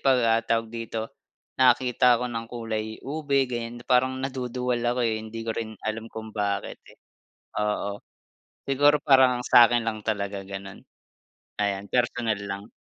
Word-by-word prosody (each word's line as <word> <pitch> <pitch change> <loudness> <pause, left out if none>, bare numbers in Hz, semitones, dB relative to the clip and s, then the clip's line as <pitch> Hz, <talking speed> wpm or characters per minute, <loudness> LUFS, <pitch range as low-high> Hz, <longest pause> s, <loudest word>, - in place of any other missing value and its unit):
pag, 135 -2 +4
ah, 115 0 +4
tawag 115 0 -1
dito, 115 -1 -5 0.5
nakakita 125 -1 +5
ako 125 - -3
ng 115 0 -4
kulay 115 -2 -3 0.2
ube 140 -1 +1
ganyan, 120 -1 -5
parang 130 +1 +2
naduduwal 125 -2 -2
ako, 120 +1 0
eh, 110 -1 +1
hindi 115 +1 -7
ko 115 - -2
rin 110 -1 -5
alam 110 +1 -3
kung 110 -1 -8
bakit, 100 -2 -2
eh. - - -17 0.6
Oo. 105 -1 -2 0.7
Siguro 145 +2 +4
parang 130 -3 +5
sa 120 -2 +9
akin 120 -1 +1
lang 110 -1 -2
talaga 100 -2 -2
ganun. 100 +1 -8 0.8
Ayan 100 -1 -1
personal 120 -3 0
lang. 100 +2 -6
115 Hz, 150 wpm, -26 LUFS, 110-125 Hz, 0.8 s, sa